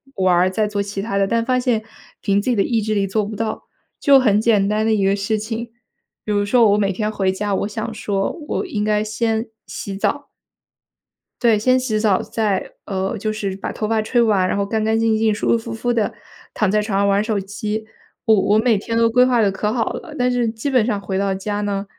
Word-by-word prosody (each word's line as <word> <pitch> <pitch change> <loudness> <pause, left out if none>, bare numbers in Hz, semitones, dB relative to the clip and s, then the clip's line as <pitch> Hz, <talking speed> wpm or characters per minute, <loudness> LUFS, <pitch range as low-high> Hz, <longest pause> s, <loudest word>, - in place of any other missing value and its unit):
玩 185 -2 +3
儿， 180 +2 +3
再 210 +3 0
做 205 -1 -2
其 200 0 -4
他 200 -2 -2
的， 195 - +2
但 230 +2 0
发 255 0 +1
现 245 -4 0 0.4
凭 200 -1 +1
自 230 - -2
己 245 - +2
的 200 - +2
意 230 -2 0
志 215 0 -1
力 200 -1 +1
做 210 +3 0
不 215 +1 -6
到。 220 +1 -3 0.3
就 275 -1 +6
很 210 -5 +3
简 215 -3 +3
单 215 +1 0
的 220 - +2
一 200 -2 +1
个 195 +1 +3
事 205 +2 -1
情， 225 +2 -5 0.5
比 215 - -2
如 205 0 +1
说 225 0 +4
我 205 - +3
每 200 -1 +1
天 210 +3 -2
回 195 -3 0
家， 200 +1 -2
我 200 - -1
想 220 +1 -5
说 200 -3 -1 0.2
我 - - -1
应 245 - -2
该 210 0 +1
先 220 +1 -1 0.2
洗 195 - -6
澡 285 +8 -1 1.1
对， 230 -4 +4
先 255 +4 +3
洗 235 -4 -1
澡 210 -4 +2
再 210 -4 -2
呃， 190 +2 -2
就 215 +1 -2
是 200 -3 -3
把 - - -4
头 215 - -3
发 220 0 +1
吹 240 +3 +1
完， 205 -5 +3
然 - - -1
后 200 - 0
干 220 +2 -1
干 220 +1 +1
净 225 -1 +2
净、 220 0 +2
舒 210 - -2
舒 - - +4
服 225 0 -6
服 240 +2 -1
地 225 -3 0 0.4
躺 210 - +1
在 210 +1 +2
床 210 -2 -2
上 200 - +2
玩 200 0 +3
儿 - - +1
手 215 -1 -1
机。 210 +2 -4 0.4
我 220 - +4
我 205 +2 +3
每 225 0 +3
天 230 +3 -3
都 230 0 +4
规 250 +2 +5
划 245 -2 +3
得 205 -2 +3
可 210 +2 -2
好 230 -1 -1
了， 320 -4 -8
但 250 -1 +1
是 245 -1 +1
基 225 +5 -4
本 255 -5 +3
上 215 -4 -1
回 190 -1 -3
到 195 -1 0
家 205 +2 -3
呢， 200 -1 -2
215 Hz, 270 characters per minute, -20 LUFS, 200-230 Hz, 1.1 s, 就